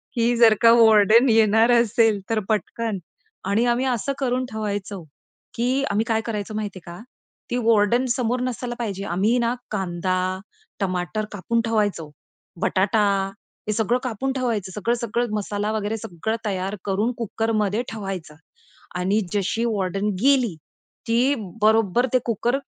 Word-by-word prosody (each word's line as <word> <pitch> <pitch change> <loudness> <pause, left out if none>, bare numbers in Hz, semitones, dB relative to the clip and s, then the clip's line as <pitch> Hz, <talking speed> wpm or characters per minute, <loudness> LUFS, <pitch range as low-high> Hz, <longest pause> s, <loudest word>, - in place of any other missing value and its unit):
की 235 +1 +2
जर 230 -2 +7
का 230 -1 +7
वॉर्डन 220 +3 +6
येणार 225 +1 +4
असेल 225 -2 +2
तर 225 -1 +1
पटकन 220 0 -1 0.5
आणि 220 +4 +2
आम्ही 245 +2 +1
असं 255 +2 -1
करून 255 -1 0
ठेवायचो 205 -3 -4 0.5
की 255 +4 0
आम्ही 210 +2 +1
काय 225 -1 +1
करायचं 215 -1 -4
माहिती 205 -3 -4
आहे 170 - -9
का, 215 - -11 0.5
ती 245 - 0
वॉर्डन 230 +2 +3
समोर 245 -1 -1
नसायला 250 -1 -3
पाहिजे. 200 -4 -3
आम्ही 200 +7 +1
ना 235 0 +1 0.2
कांदा, 185 -1 -1 0.4
टमाटर 185 +2 -2
कापून 230 +3 -1
ठेवायचो. 205 -8 -1 0.5
बटाटा 200 +3 +2 0.7
हे 215 - +1
सगळं 225 +3 +1
कापून 255 +2 -2
ठेवायचं. 230 -8 -2
सगळं-सगळं 235 +3 -1
मसाला 205 +1 -2
वगैरे 215 0 -2
सगळं 210 +3 -4
तयार 195 0 -2
करून 205 +4 0
कुकरमध्ये 220 -1 -1
ठेवायचा 195 -7 -6 0.6
आणि 195 +4 +1
जशी 210 +3 0
वॉर्डन 200 -1 -1
गेली, 255 -8 +3 0.5
की 245 +5 +2 0.3
बरोबर 220 +2 +3
ते 255 - +5
कुकर 240 +3 0
220 Hz, 135 wpm, -23 LUFS, 200-235 Hz, 0.7 s, जर